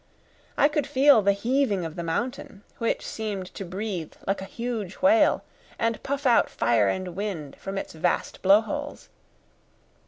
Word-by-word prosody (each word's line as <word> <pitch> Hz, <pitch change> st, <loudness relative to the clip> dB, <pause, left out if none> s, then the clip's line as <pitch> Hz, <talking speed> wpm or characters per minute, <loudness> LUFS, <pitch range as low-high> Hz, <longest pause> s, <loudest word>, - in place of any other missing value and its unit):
I -, -, +6 dB
could 295 Hz, -2 st, -1 dB
feel 280 Hz, -3 st, +5 dB
the 200 Hz, 0 st, +4 dB
heaving 220 Hz, -3 st, 0 dB
of 160 Hz, 0 st, -6 dB
the 175 Hz, -, -4 dB
mountain, 205 Hz, +4 st, -4 dB, 0.2 s
which 230 Hz, -, -1 dB
seemed 210 Hz, -4 st, -4 dB
to -, -, -6 dB
breathe 185 Hz, -2 st, -4 dB
like 195 Hz, 0 st, -1 dB
a -, -, -5 dB
huge 225 Hz, -3 st, -4 dB
whale, 300 Hz, +1 st, +4 dB, 0.3 s
and 230 Hz, -1 st, -1 dB
puff 280 Hz, +1 st, -3 dB
out 240 Hz, -2 st, +4 dB
fire 115 Hz, -3 st, +2 dB
and 185 Hz, -, -2 dB
wind 185 Hz, -8 st, -4 dB
from 195 Hz, 0 st, -5 dB
its -, -, -5 dB
vast 170 Hz, +2 st, -1 dB
blowholes. 225 Hz, +10 st, +1 dB
205 Hz, 155 wpm, -26 LUFS, 185-260 Hz, 0.3 s, I